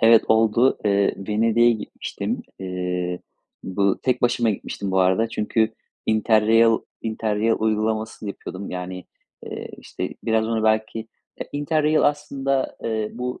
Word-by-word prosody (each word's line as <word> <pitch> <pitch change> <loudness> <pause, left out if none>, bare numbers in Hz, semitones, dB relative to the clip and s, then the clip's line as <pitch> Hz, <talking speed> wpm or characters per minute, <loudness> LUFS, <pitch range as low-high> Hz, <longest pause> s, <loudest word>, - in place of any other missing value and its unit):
Evet, 115 0 +6
oldu. 115 +3 +4
Eee, 100 -1 +3
Venedik'e 115 +2 +4
gitmiştim. 110 -2 -4 0.2
Eee, 90 -1 -3 0.4
bu 100 +1 0
tek 125 -1 0
başıma 120 -1 +3
gitmiştim 100 -1 -4
bu 95 0 +3
arada. 95 +5 +3
Çünkü 110 0 0 0.3
interrail 110 +1 +4 0.2
interrail 110 0 0
uygulamasını 110 0 -1
yapıyordum. 95 0 -7
Yani, 90 0 -5 0.4
eee, - - -6
işte, - - -5
biraz 110 -1 +2
onu 110 -1 0
belki, 110 0 +1 0.4
eee, - - -5
interrail 155 +1 +2
aslında, 140 -2 0
eee, 110 -1 -1
bu 125 +1 -4
110 Hz, 125 wpm, -23 LUFS, 100-115 Hz, 0.4 s, Evet